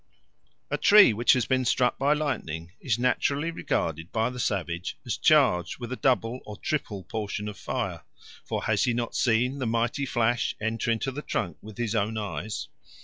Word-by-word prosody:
A - - 0
tree 205 - +7
which 120 +3 +4
has 125 - +1
been 130 -1 +1
struck 125 0 +1
by 140 +2 +3
lightning 95 - -3
is 120 -5 0
naturally 140 +5 +1
regarded 80 - -2
by 115 +2 0
the 125 - -7
savage 90 -5 -2
as - - -1
charged 90 -1 +3
with 120 -1 -7
a - - -1
double 125 -2 +1
or 105 -1 -9
triple 110 -11 -3
portion 105 +1 -4
of 105 - -5
fire; - - -3 0.4
for - - -3
has - - +2
he 120 - +1
not 120 -1 -2
seen 125 +3 +2
the 130 - -1
mighty 120 +4 0
flash 120 0 +1
enter 110 +2 -1
into 115 +4 0
the 145 +3 -5
trunk 85 - -3
with 110 +1 -11
his 120 -2 -1
own 110 0 0
eyes? 105 0 -4
115 Hz, 185 wpm, -27 LUFS, 105-130 Hz, 0.4 s, tree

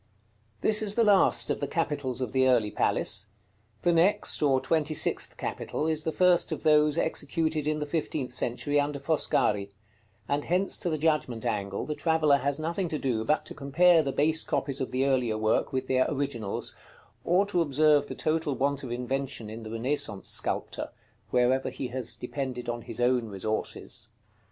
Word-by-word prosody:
This 215 0 +2
is 210 -1 -2
the 235 - +4
last 205 -3 +4
of - - -2
the - - -2
capitals 145 -6 -2
of 125 -4 -2
the 130 0 +3
early 115 -5 +3
palace; - - 0 0.6
the 175 - +3
next, 175 +5 +3
or 135 -3 +3
twenty 155 +1 0
sixth - - -2
capital, - - -3
is 155 -1 0
the 160 - 0
first 180 +1 +3
of - - -4
those 150 0 +4
executed 160 -1 -1
in 155 0 +1
the 150 - -3
fifteenth 145 -4 -3
century 145 +5 0
under 145 0 -1
Foscari; 120 -9 +1 0.6
and 145 +1 -1
hence 185 +3 +1
to 175 - -1
the 155 - -1
Judgment 150 -7 0
angle 100 -4 -2
the 155 - -3
traveller 155 -2 +3
has 140 +1 -1
nothing 170 +4 -2
to 155 - -3
do 125 -6 -1
but 150 +6 0
to - - -8
compare 165 +4 +4
the 140 -3 -2
base 155 +3 +1
copies 135 -1 -2
of 130 - -2
the 130 +1 0
earlier 125 -5 +1
work 110 +4 +1
with 130 -1 -2
their 130 0 +2
originals, 135 -8 -3 0.5
or 180 +4 +3
to 190 -4 0
observe 150 -1 +3
the - - -6
total 155 -2 0
want 140 +1 0
of 125 - -6
invention 125 -2 -3
in 115 +1 -7
the 110 - -8
Renaissance 115 -3 -1
sculptor, - - -1 0.4
wherever 125 +1 +2
he 130 - -5
has 125 -1 -2
depended 125 -1 -5
on 120 0 -3
his - - -8
own 120 -1 +2
resources. 105 +2 -4
140 Hz, 180 wpm, -28 LUFS, 125-155 Hz, 0.6 s, the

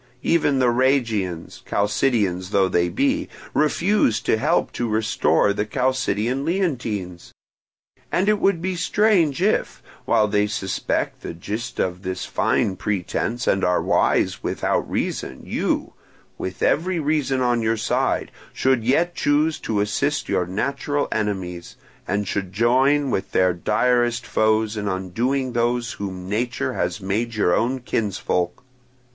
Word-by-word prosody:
Even 150 -4 +2
the 125 -2 +3
Rhegians, 115 -9 0
Chalcidians 100 -4 0
though 100 -2 +3
they 85 -1 +1
be, 280 +2 0 0.2
refuse 155 - +2
to - - +2
help 150 +10 +1
to 120 -1 -2
restore 110 -1 +2
the 105 - -1
Chalcidian 125 +1 0
Leontines; 120 - -2 0.8
and 190 +3 +1
it 210 -1 +3
would 195 -5 +1
be 185 0 -1
strange 180 -4 +2
if, 215 - 0 0.2
while 105 - +3
they 105 0 +1
suspect 95 -2 -2
the - - -6
gist 105 +8 -5
of 90 0 -1
this 95 -1 -4
fine 95 - 0
pretence 105 +6 -2
and 95 0 +1
are 90 0 +3
wise - - +1
without - - -1
reason, 65 - -3
you, - - -1 0.4
with 95 - -5
every 175 +3 +1
reason 145 -3 0
on 120 -2 +1
your 115 0 +1
side, 110 - 0 0.2
should 130 -3 +1
yet 165 +9 +2
choose 150 +1 +1
to 105 -2 -1
assist 145 +8 -1
your 90 - 0
natural 140 +8 -1
enemies, 95 -5 -3 0.3
and 105 -1 -1
should 95 -1 -3
join 130 +6 +3
with 95 - -2
their 90 -1 +3
direst 120 +5 +1
foes 110 0 +1
in 105 -1 -3
undoing 120 +8 -1
those 120 0 0
whom 95 -2 -6
nature 120 +5 -1
has 85 -2 -2
made 110 +5 -2
your 90 -5 +3
own 130 +3 0
kinsfolk. 100 -5 -2
115 Hz, 140 wpm, -22 LUFS, 100-135 Hz, 0.8 s, the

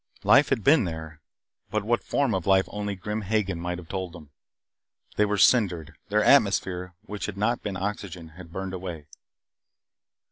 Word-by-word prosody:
Life 145 - +6
had 125 -6 0
been 140 -5 +5
there, 80 -2 -7 0.5
but 110 -1 -1
what 120 +3 0
form 140 -5 0
of 95 -2 -2
life 95 0 +4
only 105 -1 -4
Grim 105 +3 -4
Hagen 100 -3 -1
might 90 +1 -3
have 90 -2 -10
told 95 -1 -4
them. 75 -5 -13 0.8
They 105 - +3
were 105 0 -1
cindered 95 - +3
their - - +2
atmosphere, 90 -1 +3
which 105 -1 -5
had 100 -2 -6
not 115 +4 0
been 100 -3 -4
oxygen, 95 -4 -5
had 80 +1 -13
burned 95 +1 -5
away. 90 -5 -6
95 Hz, 170 wpm, -26 LUFS, 90-105 Hz, 0.8 s, Life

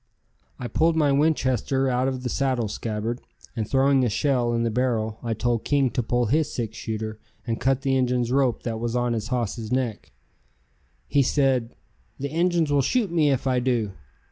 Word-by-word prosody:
I 125 - -5
pulled 160 +8 +2
my 150 -3 +3
Winchester 135 -3 +1
out 130 0 +1
of 130 -1 -3
the 125 - -2
saddle 130 -3 0
scabbard 110 +3 -3 0.3
and 110 -3 -3
throwing 135 0 +3
a 120 - +2
shell 125 +1 +1
in 115 0 0
the 115 - 0
barrel, 110 -2 -1
I 115 -2 -2
told 120 +1 0
King 140 -3 +2
to 125 - 0
pull 120 +1 0
his 150 +7 +1
six 115 -2 -4
shooter 110 -1 -4 0.3
and 115 -1 -3
cut 135 +1 +1
the 135 -1 +2
Injun's 125 -2 +1
rope 130 -3 +1
that 115 -2 -3
was 120 +1 -2
on 120 -1 +1
his 110 -1 -3
hoss's 115 -2 -2
neck. 125 -4 -2 1.0
He 145 - +3
said: 130 -3 +1 0.4
"The 140 +1 -3
Injuns 170 -1 +1
will 145 -1 +4
shoot 205 - +1
me 160 -4 +3
if 135 -2 0
I 130 -1 +2
do." 120 -5 0
125 Hz, 190 wpm, -25 LUFS, 115-135 Hz, 1.0 s, will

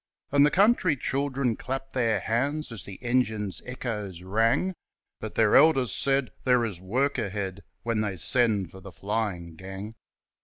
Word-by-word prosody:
And 140 0 +5
the 145 - +6
country 190 -4 +3
children 135 -2 0
clapped 135 +3 -5
their 115 -6 +1
hands 140 +6 -1
As 115 -5 -5
the 100 -2 -9
engine's 110 -5 0
echoes 105 -8 -5
rang, 115 - +2 0.5
But 110 -1 -6
their 110 -2 +4
elders 135 -7 +5
said: 135 -2 +1
'There 125 -2 +3
is 95 -6 -5
work 130 +9 0
ahead 100 -3 -3 0.2
When 115 -1 0
they 100 -3 -2
send 105 - +1
for 95 - -11
the 95 - -10
flying 95 -4 -3
gang.' 95 +4 -7
115 Hz, 155 wpm, -27 LUFS, 100-135 Hz, 0.5 s, the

